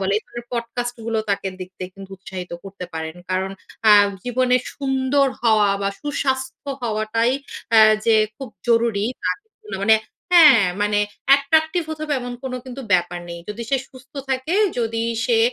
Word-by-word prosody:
বলে। 195 0 0
এই 215 - -2
ধরনের 235 0 -9
পডকাস্ট 240 +1 -3
গুলো 225 -1 0
তাকে 195 -1 0
দেখতে 185 0 -8
কিন্তু 195 0 -11
উৎসাহিত 185 -2 -8
করতে 195 -1 -8
পারেন। 160 +1 -5
কারণ 190 +1 0 0.4
আ - - +10 0.3
জীবনে 250 0 +2 0.2
সুন্দর 270 0 +1 0.2
হওয়া 215 -3 +4
বা 200 - +1
সুস্বাস্থ্য 265 -2 -2
হওয়াটাই 225 +1 0 0.4
আ - - +9 0.3
যে 225 -1 +5 0.2
খুব 270 -3 -7 0.2
জরুরী 230 -3 +2 0.2
বা - - +1 0.5
মানে 220 +2 +6 0.4
হ্যাঁ। 295 - +8 0.2
মানে 210 0 +2 0.3
অ্যাট্রাকটিভ 315 +5 +4
হতে 315 -1 -5
হবে 300 -1 -1
এমন 245 0 -5
কোন 260 - -4
কিন্তু 260 +1 -7
ব্যাপার 175 -1 +1
নেই। 170 0 -7
যদি 215 +3 -5
সে 275 - +4
সুস্থ 260 0 -16 0.2
থাকে, 265 +6 -1 0.2
যদি 225 -1 -1 0.2
সে 235 -3 +3
235 Hz, 160 wpm, -21 LUFS, 200-265 Hz, 0.5 s, আ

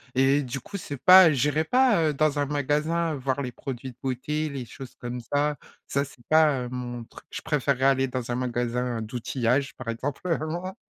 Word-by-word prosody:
et 135 +2 +4
du 130 0 -5
coup 200 - -7
c'est 145 -5 -6
pas 180 +4 +8
j'irai 145 +4 +1
pas, 250 -4 +4
heu, - - -5
dans 150 0 +1
un 145 - +2
magasin 150 +4 0
voir 135 +1 -2
les 125 -3 -4
produits 130 -1 -6
de 125 - -22
beauté, 140 +4 -2
les 140 -3 -5
choses 130 +2 -11
comme 120 0 -5
ça. 145 +4 0 0.3
Ça 140 +1 0
c'est 125 -3 -16
pas, 155 -4 +4
heu, 125 - -5
mon 120 -1 -5
truc, - - -15
je - - -6
préférerais 140 -3 0
aller 135 -1 +3
dans 125 -2 -4
un 120 - 0
magasin 125 -1 -1
d'outillage 125 +3 -1
par 115 - -7
exemple 130 +5 -3
vraiment. 175 +2 -2
135 Hz, 200 wpm, -26 LUFS, 125-150 Hz, 0.3 s, pas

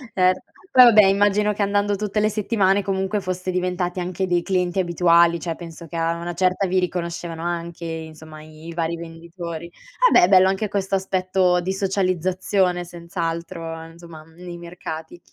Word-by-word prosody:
Certo, 185 0 +3 0.3
poi 255 - +8
vabbè 215 -3 +7
immagino 205 +2 +3
che 205 - -4
andando 205 0 +1
tutte 210 +1 -2
le 215 0 +2
settimane 205 -2 +1
comunque 195 +1 -1
foste 185 0 -3
diventati 180 0 -2
anche 180 +1 -2
dei 175 -1 +1
clienti 180 -1 0
abituali, 170 -1 +3
cioè 165 0 -4
penso 170 0 -10
che 165 - -10
a 165 0 0
una 170 +1 -5
certa 185 +2 +1
vi 185 +1 +2
riconoscevano 170 -2 -4
anche 170 0 -4
insomma 160 -1 -8
i 155 +1 -13
i 170 - -6
vari 165 0 -2
venditori. 170 0 -8 0.4
Vabbè, - - +6
è - - +6
bello 190 -1 +6
anche 195 +3 -1
questo 195 -1 -1
aspetto 185 -1 +1
di 185 +2 -2
socializzazione 185 -1 0
senz'altro 170 -1 -5
insomma 165 -1 -13
nei 175 +2 -10
mercati. 170 -1 -8
180 Hz, 165 wpm, -22 LUFS, 170-190 Hz, 0.4 s, poi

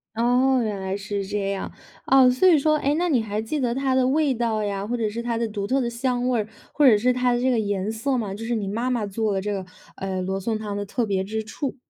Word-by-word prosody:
哦， 250 +2 +3
原 210 -3 -3
来 190 0 -3
是 200 -1 -4
这 200 0 -2
样。 195 - -4 0.3
啊， 265 -1 +6
所 255 +9 +3
以 345 - +7
说 305 +2 +2
诶， 285 0 +1
那 350 +1 0
你 250 -6 +3
还 210 0 -3
记 290 +7 -3
得 240 -2 0
它 265 0 0
的 255 -1 +3
味 295 +1 +2
道 225 -2 -1
呀， 200 -1 -2
或 240 +3 -2
者 220 -3 -1
是 235 +3 -5
它 235 -1 -1
的 230 - 0
独 205 -2 -4
特 265 +4 +1
的 235 - -1
香 245 +1 -1
味， 225 -4 +1 0.3
或 295 - +2
者 235 -5 +8
是 245 +5 +2
它 250 0 +1
的 240 - +1
这 260 - +2
个 245 - +2
颜 205 -1 -1
色 260 +5 -1
吗？ 215 -5 -2
就 225 +2 -7
是 240 - -1
你 210 -4 -2
妈 235 +5 -1
妈 225 -4 -1
做 210 +1 -1
的 190 - -1
这 205 +1 -3
个， 190 -2 -3 0.3
呃， 190 -1 -3
罗 190 +1 -2
宋 220 +3 -2
汤 205 -2 -4
的 205 - -3
特 235 +4 -2
别 190 -2 0
之 220 +2 -3
处。 265 +6 -4
225 Hz, 300 characters per minute, -24 LUFS, 205-255 Hz, 0.3 s, 者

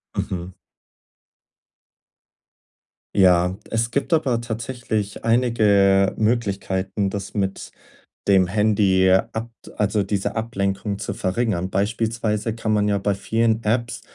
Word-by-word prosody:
Mhm. 90 0 -4 2.6
Ja, 90 -1 +4
es 115 +1 -1
gibt 140 +6 -2
aber 130 -8 +2
tatsächlich 115 -3 -4
einige 105 -5 +3
Möglichkeiten, 100 -3 -1
das 100 +1 -6
mit 95 -1 -3 0.6
dem 95 -2 +4
Handy 100 -1 +3
abt 110 +5 -2
also, 105 0 +1
diese 100 0 -2
Ablenkung 100 -2 -2
zu - - -4
verringern. 95 -2 -1
Beispielsweise 110 +1 -1
kann 110 -1 -1
man 105 -1 +2
ja 100 - +2
bei 100 +1 0
vielen 110 +3 0
Apps 115 +1 -1
105 Hz, 105 wpm, -22 LUFS, 95-115 Hz, 2.6 s, Ja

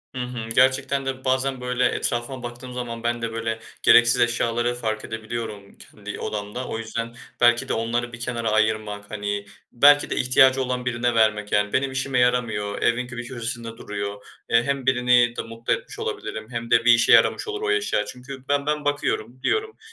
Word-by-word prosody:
Hı - - -4
hı. 125 -2 -5
Gerçekten 135 +1 +2
de 130 0 -4
bazen 130 0 0
böyle 125 0 0
etrafıma 120 +2 -2
baktığım 120 +1 -8
zaman 120 -2 -5
ben 120 0 -1
de 115 0 -2
böyle 115 0 -3 0.2
gereksiz 120 0 +6
eşyaları 120 0 +1
fark 110 -3 -3
edebiliyorum 110 -2 -6
kendi - - -9
odamda. 105 +4 -4
O - - -4
yüzden 115 +1 -5 0.3
belki 120 0 +4
de - - +1
onları 120 +2 -2
bir 120 - -8
kenara 120 -2 -2
ayırmak 110 -1 0
hani, 100 -1 -3 0.3
belki 145 +4 +5
de - - -1
ihtiyacı 130 +1 +4
olan 125 -1 -3
birine 120 -1 0
vermek 105 -2 +2
yani, 105 0 +1
benim 135 +1 +1
işime 130 -1 -1
yaramıyor. 115 -5 0
Evin 120 +1 +1
bir 120 -1 -6
köşesinde 115 -2 -6
duruyor. 100 -1 -6 0.2
Hem 130 +3 +1
birini 125 -2 +3
de - - -2
mutlu 115 0 -2
etmiş - - -6
olabilirim 110 0 -5
hem 115 0 -5
de 115 0 +4
bir 120 - +7
işe 115 0 +3
yaramış - - +4
olur 420 0 -4
o 430 -1 0
eşya. 420 0 0
Çünkü 130 +1 -9
ben 145 0 +1
ben 150 0 -1
bakıyorum, 130 -4 -1
diyorum. 435 0 -1
120 Hz, 180 wpm, -23 LUFS, 115-130 Hz, 0.3 s, bir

